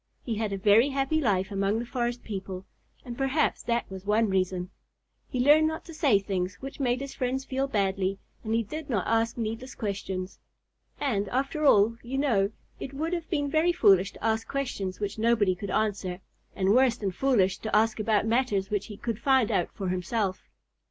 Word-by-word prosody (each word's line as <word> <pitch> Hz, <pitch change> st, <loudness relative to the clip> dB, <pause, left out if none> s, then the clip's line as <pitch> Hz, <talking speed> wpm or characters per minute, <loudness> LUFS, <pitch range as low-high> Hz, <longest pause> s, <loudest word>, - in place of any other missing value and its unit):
He 235 Hz, -, -3 dB
had 215 Hz, -1 st, -2 dB
a 195 Hz, -, -2 dB
very 210 Hz, +7 st, +5 dB
happy 275 Hz, +3 st, 0 dB
life 195 Hz, -6 st, +1 dB
among 200 Hz, +2 st, 0 dB
the 235 Hz, -, -3 dB
forest 240 Hz, 0 st, -2 dB
people, 190 Hz, -2 st, -6 dB, 0.4 s
and 240 Hz, -1 st, -6 dB
perhaps 270 Hz, +4 st, +1 dB
that 235 Hz, 0 st, -1 dB
was 190 Hz, -1 st, -7 dB
one 210 Hz, +2 st, +2 dB
reason. 185 Hz, -1 st, -1 dB, 0.6 s
He 250 Hz, -, -3 dB
learned 300 Hz, +4 st, +6 dB
not 315 Hz, 0 st, -4 dB
to 330 Hz, -, -10 dB
say 290 Hz, -, +3 dB
things 190 Hz, -2 st, -2 dB
which 270 Hz, +9 st, -9 dB
made 250 Hz, -1 st, 0 dB
his 275 Hz, 0 st, -6 dB
friends 260 Hz, +1 st, -2 dB
feel 270 Hz, +1 st, -1 dB
badly, 195 Hz, -4 st, 0 dB, 0.3 s
and 220 Hz, 0 st, -1 dB
he 230 Hz, -, +2 dB
did 305 Hz, +7 st, -7 dB
not 210 Hz, -8 st, 0 dB
ask 225 Hz, +1 st, +1 dB
needless 230 Hz, +3 st, -4 dB
questions. 195 Hz, -3 st, -4 dB, 0.6 s
And 205 Hz, -8 st, 0 dB
after 275 Hz, +4 st, -1 dB
all, 220 Hz, 0 st, +5 dB
you 255 Hz, +3 st, -4 dB
know, 225 Hz, -9 st, +2 dB, 0.3 s
it 275 Hz, -, -7 dB
would 320 Hz, +5 st, -2 dB
have 340 Hz, -2 st, -3 dB
been 290 Hz, -5 st, 0 dB
very 315 Hz, +4 st, +3 dB
foolish 195 Hz, -, +4 dB
to -, -, -14 dB
ask 225 Hz, 0 st, 0 dB
questions 245 Hz, -9 st, -3 dB
which 205 Hz, +1 st, -3 dB
nobody 220 Hz, -4 st, +3 dB
could 195 Hz, +2 st, -7 dB
answer, 195 Hz, -3 st, -1 dB, 0.4 s
and 190 Hz, +1 st, +2 dB
worse 250 Hz, -1 st, +4 dB
than 200 Hz, -4 st, -2 dB
foolish 195 Hz, -4 st, +2 dB
to 220 Hz, -, -2 dB
ask 220 Hz, +1 st, +3 dB
about 215 Hz, -1 st, +2 dB
matters 225 Hz, -4 st, 0 dB
which 205 Hz, -1 st, -1 dB
he 210 Hz, -3 st, -9 dB
could 230 Hz, -1 st, -3 dB
find 260 Hz, -4 st, +3 dB
out 185 Hz, -4 st, +1 dB
for 195 Hz, -3 st, -4 dB
himself. 185 Hz, +2 st, -2 dB
225 Hz, 195 wpm, -27 LUFS, 195-265 Hz, 0.6 s, learned